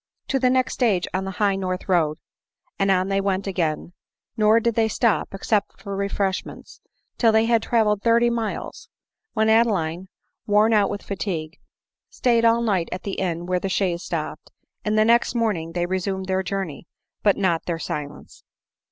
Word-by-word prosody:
" -, -, -57 dB
To 270 Hz, -, +1 dB
the 255 Hz, 0 st, +3 dB
next 255 Hz, 0 st, +1 dB
stage 210 Hz, -8 st, +1 dB
on 190 Hz, +1 st, -1 dB
the -, -, -3 dB
high 205 Hz, -2 st, +2 dB
north 185 Hz, -1 st, -3 dB
road." 160 Hz, -5 st, +2 dB, 0.6 s
And 195 Hz, 0 st, +2 dB
on 190 Hz, 0 st, +2 dB
they 195 Hz, 0 st, +1 dB
went 195 Hz, -1 st, -1 dB
again; 175 Hz, -3 st, -2 dB, 0.4 s
nor 215 Hz, 0 st, +4 dB
did 235 Hz, 0 st, 0 dB
they 225 Hz, 0 st, +2 dB
stop, 220 Hz, 0 st, +1 dB
except 200 Hz, +1 st, -1 dB
for 200 Hz, -1 st, -6 dB
refresh 200 Hz, -1 st, -1 dB
ments, -, -, -12 dB, 0.4 s
till 230 Hz, -2 st, +5 dB
they 220 Hz, +1 st, +3 dB
had 230 Hz, -1 st, +3 dB
travelled 215 Hz, -3 st, +1 dB
thirty 235 Hz, +1 st, +3 dB
miles; 230 Hz, -3 st, -4 dB, 0.4 s
when 220 Hz, -1 st, +2 dB
Ade 225 Hz, +2 st, +5 dB
line, 175 Hz, -3 st, -2 dB, 0.4 s
worn 210 Hz, +2 st, +4 dB
out 205 Hz, -2 st, +3 dB
with 205 Hz, -, -5 dB
fatigue, 175 Hz, -5 st, -4 dB, 0.5 s
stayed 235 Hz, -2 st, +1 dB
all 230 Hz, +1 st, +4 dB
night 190 Hz, -7 st, 0 dB
at 185 Hz, -, -5 dB
the 195 Hz, -, -4 dB
inn 175 Hz, -2 st, -2 dB
where 180 Hz, 0 st, 0 dB
the 195 Hz, -, -3 dB
chaise 180 Hz, -3 st, 0 dB
stopped, -, -, -5 dB, 0.3 s
and 215 Hz, 0 st, 0 dB
the 215 Hz, -, +5 dB
next 235 Hz, +1 st, +3 dB
morning 195 Hz, -9 st, -1 dB
they 175 Hz, 0 st, 0 dB
resumed 190 Hz, +1 st, -2 dB
their 190 Hz, 0 st, 0 dB
journey, 185 Hz, -4 st, -4 dB, 0.3 s
but 205 Hz, -2 st, +3 dB
not 175 Hz, -4 st, 0 dB
their 170 Hz, -2 st, -1 dB
silence. 150 Hz, -3 st, -7 dB
195 Hz, 185 wpm, -23 LUFS, 185-220 Hz, 0.6 s, till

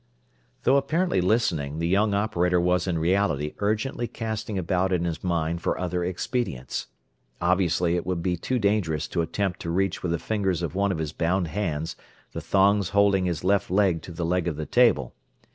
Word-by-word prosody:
Though 135 Hz, +2 st, +4 dB
apparently 155 Hz, -, +1 dB
listening, 85 Hz, -8 st, 0 dB
the 85 Hz, +1 st, -1 dB
young 100 Hz, +3 st, +2 dB
operator 90 Hz, -4 st, +1 dB
was 90 Hz, +2 st, +1 dB
in 90 Hz, -3 st, 0 dB
reality 80 Hz, -4 st, +1 dB
urgently 110 Hz, +4 st, -1 dB
casting 110 Hz, -3 st, -4 dB
about 95 Hz, +1 st, 0 dB
in 90 Hz, -2 st, +1 dB
his 85 Hz, -2 st, -3 dB
mind 85 Hz, -1 st, -1 dB
for -, -, -1 dB
other 90 Hz, -1 st, -1 dB
expedients. 90 Hz, -, -3 dB, 0.5 s
Obviously 90 Hz, -1 st, +2 dB
it 90 Hz, -, -1 dB
would 90 Hz, -2 st, -2 dB
be 90 Hz, 0 st, +1 dB
too 125 Hz, +9 st, -2 dB
dangerous 100 Hz, -9 st, 0 dB
to 85 Hz, -, 0 dB
attempt 95 Hz, +2 st, -2 dB
to 85 Hz, -, -5 dB
reach 95 Hz, +2 st, 0 dB
with 90 Hz, -, -2 dB
the 85 Hz, -, +1 dB
fingers 95 Hz, -2 st, -1 dB
of 85 Hz, -, -3 dB
one 100 Hz, +1 st, +1 dB
of 95 Hz, -, -2 dB
his 80 Hz, -2 st, -3 dB
bound 85 Hz, 0 st, 0 dB
hands 80 Hz, -4 st, -2 dB, 0.4 s
the -, -, -5 dB
thongs 100 Hz, -1 st, +3 dB
holding 100 Hz, -2 st, +3 dB
his 85 Hz, -2 st, -2 dB
left 100 Hz, +1 st, +2 dB
leg 95 Hz, -3 st, +2 dB
to -, -, -10 dB
the 85 Hz, 0 st, -3 dB
leg 90 Hz, +1 st, 0 dB
of 80 Hz, -, -1 dB
the 80 Hz, +1 st, -4 dB
table. 115 Hz, -, +3 dB
90 Hz, 190 wpm, -25 LUFS, 85-100 Hz, 0.5 s, Though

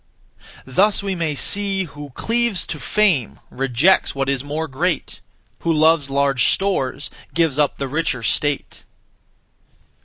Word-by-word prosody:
Thus 195 Hz, +10 st, +2 dB
we 195 Hz, -1 st, -2 dB
may 165 Hz, -4 st, -2 dB
see, 195 Hz, +4 st, +2 dB
Who 145 Hz, -3 st, -10 dB
cleaves 235 Hz, -3 st, 0 dB
to 155 Hz, -, -6 dB
fame 170 Hz, -, +1 dB
Rejects 135 Hz, +9 st, +2 dB
what 135 Hz, 0 st, -1 dB
is 135 Hz, -1 st, -1 dB
more 155 Hz, +3 st, -3 dB
great; 160 Hz, +4 st, -2 dB, 0.4 s
Who 170 Hz, -, -1 dB
loves 155 Hz, -2 st, +3 dB
large 135 Hz, -4 st, +2 dB
stores 145 Hz, -8 st, -1 dB, 0.2 s
Gives 165 Hz, -4 st, +1 dB
up 145 Hz, -2 st, +1 dB
the 140 Hz, -, -3 dB
richer 140 Hz, -4 st, -2 dB
state. 145 Hz, +6 st, -1 dB
150 Hz, 130 wpm, -20 LUFS, 135-185 Hz, 0.4 s, loves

